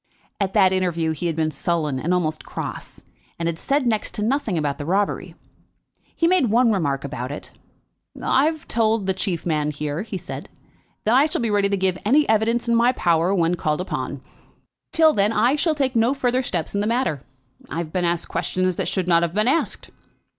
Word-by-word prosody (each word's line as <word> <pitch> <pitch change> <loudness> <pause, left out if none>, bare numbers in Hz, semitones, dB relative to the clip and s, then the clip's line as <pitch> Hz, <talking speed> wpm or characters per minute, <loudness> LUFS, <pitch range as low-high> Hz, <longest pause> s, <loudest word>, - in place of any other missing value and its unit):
At 195 0 -1
that 190 -3 +5
interview 170 -3 0
he 160 +3 -3
had 165 - -1
been 160 -1 0
sullen 155 -5 -1
and 165 +6 -2
almost 155 -4 0
cross, - - -7 0.3
and 170 - -3
had 165 -1 -2
said 280 -1 0
next 220 -3 -1
to 210 - -2
nothing 230 -5 0
about 145 -2 -1
the 145 - -4
robbery. 200 +3 -1 0.8
He 335 - +1
made 365 -5 +3
but - - -1
one 235 +2 +4
remark 145 -9 0
about 130 -2 -5
it. 145 - -7 0.7
"I 270 +2 +2
have 315 0 -2
told 225 -2 +1
the 190 - +1
chief 185 -3 -3
man 150 -3 0
here," 150 +2 -3
he 210 -2 -5
said, 180 +1 -8 0.5
"that 220 - +2
I 275 +4 +5
shall 305 - -2
be 230 -2 0
ready 200 -1 +2
to 200 - 0
give 185 -1 0
any 285 +8 +3
evidence 225 +2 +1
in 235 - +2
my 235 +2 +4
power 170 -3 +2
when 170 -1 +2
called 155 -3 -1
upon. 180 - -4 0.7
Till 320 -2 +5
then 205 +1 +2
I 235 +5 +3
shall 310 +1 +1
take 270 -3 0
no 235 +4 +3
further 255 -1 +1
steps 175 -10 -3
in 200 - 0
the 210 - 0
matter. 235 - 0 0.5
I - - -5
have 165 -2 -4
been 180 - 0
asked 170 -1 0
questions 185 -1 -1
that - - -1
should 185 -2 -1
not 170 -1 +4
have 170 +1 -1
been 215 +2 +2
asked." 315 +6 0
190 Hz, 210 wpm, -22 LUFS, 165-235 Hz, 0.8 s, that